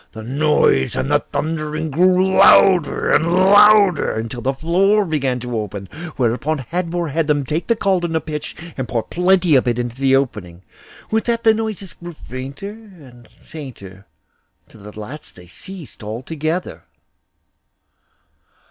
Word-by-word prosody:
The 110 - -8
noise 135 - +1
and - - -2 0.2
thundering 155 0 -3
grew 185 +4 +3
louder 190 -4 +5
and 165 +3 +2
louder, 200 - +5
until 115 +2 -5
the 130 - 0
floor 195 +8 +2
began 135 -6 -1
to 125 -1 -5
open, 100 -2 -6 0.3
whereupon 135 +5 0
Hadvor 170 +5 -3
made 160 -1 0
them 145 -2 +1
take 155 +5 -3
the 230 - +2
caldron 180 -6 0
of 160 - -2
pitch 150 -1 -6 0.2
and 130 -2 -4
pour 115 -3 -2
plenty 180 -1 +2
of 130 -2 +3
it 120 -1 +1
into 120 -1 -3
the 135 0 +2
opening. 100 -10 -3 0.5
With 220 0 0
that 235 -1 -1
the 220 - +5
noises 215 -4 -4
grew 175 0 -10
fainter 135 +10 -7
and 165 - -16
fainter, 105 - -12 0.6
till 105 -1 -15
at 105 - -12
last 125 +8 -9
they 90 - -14
ceased 170 - -9
altogether. 155 - -4
155 Hz, 145 wpm, -19 LUFS, 125-185 Hz, 0.6 s, louder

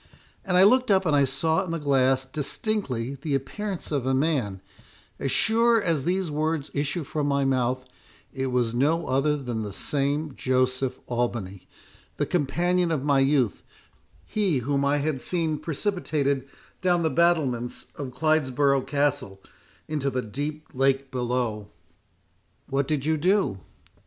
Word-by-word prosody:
And 180 -2 +1
I 185 - +7
looked 255 +5 +5
up, 190 -1 +4
and 155 -3 +3
I 140 -1 +5
saw 160 +7 0
in 185 - -7
the 165 - -1
glass 135 -3 +2
distinctly 140 - -2
the 145 -2 -1
appearance 190 +8 -4
of 140 -4 -1
a 130 - +2
man—as 120 - -3
sure 230 +1 +4
as 165 -8 0
these 180 -1 0
words 155 0 -1
issue 145 +4 -1
from 145 +1 -2
my 140 -1 +1
mouth, 130 -1 0 0.5
it 135 0 -2
was 125 -3 0
no 155 +7 +1
other 145 +3 +1
than 120 -5 -4
the 105 -2 -4
same 145 +6 -1
Joseph 130 0 0
Albany—the 115 -6 -5
companion 175 +3 +1
of 155 -5 -1
my 140 -2 +3
youth—he 145 - -1
whom 140 +3 0
I 140 +1 +2
had 145 -2 -1
seen 160 +1 0
precipitated 150 -6 -1 0.3
down 175 -2 +2
the 160 - +1
battlements 145 -9 +1
of 140 -3 -5
Clidesbrough 140 -1 +1
Castle 140 -8 0 0.5
into 145 -3 -1
the 125 -1 -2
deep 145 +7 -5
lake 135 +1 +1
below!" 120 -4 -2 1.0
"What 135 0 -1
did 150 -3 -1
you 160 0 +2
do?" 180 - +1
140 Hz, 140 wpm, -26 LUFS, 130-160 Hz, 1.0 s, I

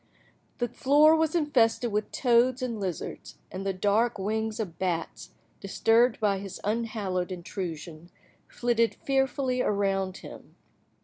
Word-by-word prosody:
The 245 - 0
floor 290 +6 +4
was 320 0 +1
infested 245 -7 +2
with 210 +1 -2
toads 250 +1 +2
and 235 -4 -3
lizards, 185 -5 -5
and 190 +1 -5
the 195 - 0
dark 205 +5 +1
wings 220 +3 -2
of 185 -7 -5
bats, 175 -3 -3 0.2
disturbed 225 +4 +2
by 200 -3 +1
his 195 -1 -8
unhallowed 205 -4 -2
intrusion, 170 -2 -6 0.4
flitted 235 -1 0
fearfully 270 -1 0
around 195 -3 0
him. - - -12
220 Hz, 125 wpm, -27 LUFS, 190-245 Hz, 0.4 s, floor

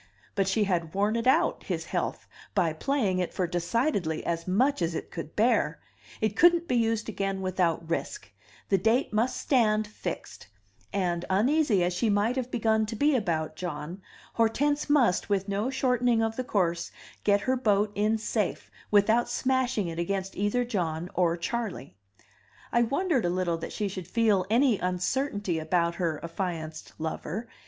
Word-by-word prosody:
But 195 -2 +1
she 210 +3 +2
had 170 -5 -1
worn 205 +3 +2
it 230 +1 -1
out, 260 - +3
his - - -3
health, - - -3 0.3
by 170 -5 +2
playing 205 - 0
it 180 - -1
for 185 - +1
decidedly 175 - -1
as 170 0 -2
much 245 +6 +2
as 165 0 0
it - - -5
could 165 -2 -7
bear; 215 -9 +2 0.4
it 215 -1 0
couldn't 345 +2 +5
be - - 0
used 225 -1 +1
again 195 -2 -2
without 180 -3 0
risk; 165 - -4 0.4
the 195 - +3
date 225 +5 +1
must 230 +4 +1
stand 215 -5 +2
fixed; 210 - -7 0.4
and, 175 -3 -1
uneasy 225 - +3
as 175 +1 0
she 215 +6 0
might 205 +4 +2
have 255 -2 -2
begun 220 -2 +1
to 225 - -4
be 290 +5 +3
about 160 -9 -1
John, 170 +1 -5 0.3
Hortense 290 +7 +1
must, 250 -12 +3
with 195 -1 0
no 205 +5 -1
shortening 250 -3 +2
of 225 0 -1
the 255 - -2
course, 175 -8 0 0.3
get 205 -1 +3
her 260 +4 +1
boat 210 -4 +2
in 210 +2 +1
safe 220 - -2 0.2
without 220 +4 +3
smashing 255 -5 0
it 165 0 -5
against 195 +2 -2
either 205 +5 0
John 175 -6 -2
or 170 -2 +2
Charley. 200 - -4 0.8
I 235 - +3
wondered 275 - +1
a - - +2
little 175 -2 0
that - - -6
she 210 - -2
should 185 -3 -6
feel 210 -2 +2
any 235 -1 +3
uncertainty 185 - -1
about 170 +1 +1
her 165 -3 0
affianced 165 -3 -5
lover. 160 +7 -4
205 Hz, 165 wpm, -28 LUFS, 175-235 Hz, 0.8 s, couldn't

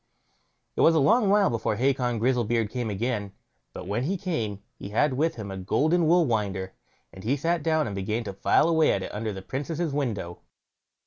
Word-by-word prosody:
It - - 0
was 165 - +5
a - - +4
long 210 - +4
while 205 -4 +4
before 115 -2 -1
Hacon 125 0 +1
Grizzlebeard 120 -2 +1
came 120 -3 -3
again; 105 -1 -2 0.4
but 90 - -8
when 105 +7 -2
he 190 +5 -1
came 115 - -3
he 100 - -9
had 135 +7 +2
with 155 +5 0
him 105 -3 -6
a 95 - -6
golden 155 - +1
wool 170 +1 +4
winder, 100 -6 -2 0.4
and 95 - -11
he 130 +6 0
sat 165 +3 0
down 155 0 +1
and 105 - -4
began 105 +4 -2
to 100 -3 -6
file 100 - +3
away 160 -2 +3
at 95 - -2
it - - -7
under 110 +1 -3
the 95 -1 -7
Princess' 150 - -3
window. 110 -12 -3
120 Hz, 200 wpm, -26 LUFS, 105-155 Hz, 0.4 s, was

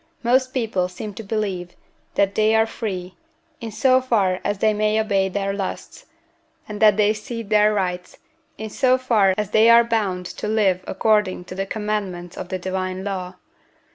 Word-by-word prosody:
Most 255 +2 +2
people 220 -8 -1
seem 205 +3 -8
to 210 - -8
believe 195 -4 -3 0.4
that 195 0 +2
they 215 +1 +3
are 220 0 +4
free, 190 -5 -5 0.5
in 230 -1 -6
so 255 +4 +3
far 200 -8 +1
as 205 0 -1
they 215 +2 +2
may 215 +1 +1
obey 195 -3 +1
their 195 +1 -2
lusts, 195 -1 -6 0.6
and 210 -2 -7
that 210 -2 +6
they 210 0 +3
cede 225 0 -7
their 210 0 +5
rights, 180 -3 -3 0.4
in 220 -1 -6
so 255 +1 +3
far 215 -7 +2
as 210 -1 -2
they 220 +1 +5
are 235 0 +8
bound 205 -6 -1
to 210 - -6
live 200 -4 +1
according 210 -5 +1
to 185 - -9
the 195 +1 -3
commandments 195 -5 -4
of 180 - -7
the 185 - -2
divine 185 0 -4
law. 185 -2 -4
210 Hz, 175 wpm, -22 LUFS, 185-220 Hz, 0.6 s, are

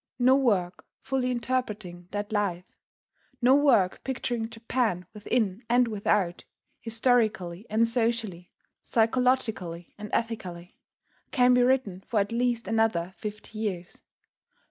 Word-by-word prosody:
No 255 +1 +5
work 200 -10 +1 0.2
fully 265 -1 -1
interpreting 215 -8 -3
that 205 +2 -4
life, 195 -4 -1 0.7
no 250 +1 +5
work 250 -10 +3
picturing 240 -3 -2
Japan 225 -5 -1
within 210 -1 -1
and 245 +1 +4
without, 200 -4 0 0.4
historically 225 -5 0
and 225 +2 +3
socially, 225 -6 -1 0.3
psychologically 225 -7 0
and 210 0 -6
ethically, 185 -7 -3 0.5
can 250 -3 +4
be 250 - +5
written 245 -7 +1
for 230 -5 +1
at 200 +1 0
least 240 -2 0
another 220 -5 +1
fifty 210 0 -7
years. 185 -5 -4
225 Hz, 115 wpm, -27 LUFS, 190-245 Hz, 0.7 s, No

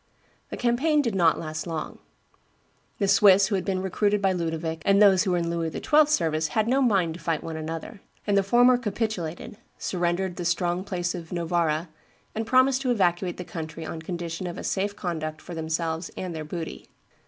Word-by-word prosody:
The - - -6
campaign 280 +6 +2
did 230 -5 -1
not 170 -4 +3
last 155 +1 -5
long. 160 -2 -5 1.0
The 200 - 0
Swiss 195 0 +6
who - - -2
had 190 -2 0
been 190 -1 -1
recruited 205 +2 +1
by 195 -1 +2
Ludovic 165 -2 -3
and 200 0 +4
those 195 -3 +6
who 190 - +1
were 180 - +2
in 170 -1 -1
Louis 165 -1 -1
XII.'s 300 - +3
service 160 - +1
had 215 +8 0
no 265 +3 +2
mind 195 -10 +2
to 170 - -10
fight 165 -4 -2
one 165 - -5
another; 160 +5 -6 0.2
and 205 - +1
the 200 - +5
former 245 +5 +4
capitulated, 210 -6 -3 0.2
surrendered 175 0 -1
the 175 - -3
strong 175 +1 0
place 175 -3 -2
of 170 -3 -8
Novara, 170 -2 0 0.5
and 220 0 -3
promised 260 +1 +4
to 260 - -1
evacuate 180 -5 +1
the 180 - -5
country 160 -1 -6
on 160 0 -6
condition 170 +1 -5
of 175 0 -6
a - - -6
safe 200 +1 -1
conduct 155 -5 -4
for 175 - -10
themselves 160 +1 -2
and 180 -3 -4
their 155 -1 -5
booty. 165 +1 -6
180 Hz, 195 wpm, -26 LUFS, 165-200 Hz, 1.0 s, Swiss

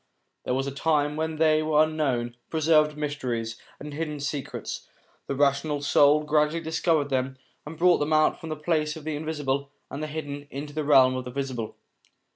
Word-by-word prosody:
There 125 - 0
was 135 +1 0
a 140 - -3
time 145 0 +1
when 160 +1 -2
they 155 0 +3
were 155 0 +4
unknown, 135 -7 -1
preserved 155 -1 +3
mysteries, 125 -7 -3 0.2
and 150 0 -8
hidden 150 -1 -3
secrets; 145 0 -5 0.4
the 140 - -2
rational 145 +1 +1
soul 145 +1 +5
gradually 150 +2 +2
discovered 160 -2 +1
them 130 0 -1 0.3
and 155 +1 -8
brought 175 +1 +4
them 145 +1 -1
out 155 0 +3
from 160 - -8
the 155 - -2
plane 155 0 0
of 160 - -9
the 155 0 -3
invisible 145 -3 -2 0.2
and 140 - -5
the 155 - -2
hidden, 145 -2 -6
into 145 +2 -6
the 155 0 -2
realm 135 -3 +5
of 130 0 -4
the - - -5
visible. 125 -4 -4
150 Hz, 185 wpm, -26 LUFS, 140-155 Hz, 0.4 s, soul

